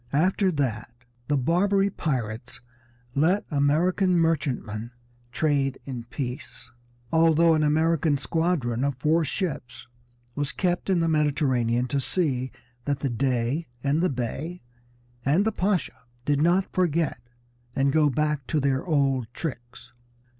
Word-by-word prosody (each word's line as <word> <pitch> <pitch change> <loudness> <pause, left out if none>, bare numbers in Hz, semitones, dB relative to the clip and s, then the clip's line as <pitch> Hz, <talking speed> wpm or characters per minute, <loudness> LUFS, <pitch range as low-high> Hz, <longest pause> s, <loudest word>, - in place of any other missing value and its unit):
After 185 +5 +2
that 120 -7 -1 0.4
the 145 - +2
Barbary 195 +8 +2
pirates 125 - -3 0.5
let 170 +9 +2
American 175 +6 +2
merchantmen 130 -9 -1 0.4
trade 140 -2 +1
in 125 -4 -6
peace, 125 -1 -6 0.4
although 165 0 +5
an 155 - +2
American 155 0 +2
squadron 135 -4 0
of 140 -2 -1
four 160 +4 +2
ships 135 -8 -4 0.5
was 145 +2 -2
kept 180 +2 -1
in 180 -3 +3
the 165 - +1
Mediterranean 130 -6 +1
to 140 - 0
see 130 -4 -1 0.3
that 140 -1 -1
the 135 - -1
Dey, 130 +5 0 0.2
and 145 +3 +2
the 185 - +2
Bey, 145 +8 -4 0.6
and 160 - +3
the 220 - +2
Pasha 195 -3 -1 0.3
did 145 -1 +2
not 175 +4 +2
forget, 165 -7 0 0.5
and 135 0 +2
go 155 -2 +4
back 150 0 -1
to 155 - +1
their 135 -1 +1
old 135 -7 +1
tricks. 120 -7 -7
145 Hz, 130 wpm, -26 LUFS, 130-165 Hz, 0.6 s, although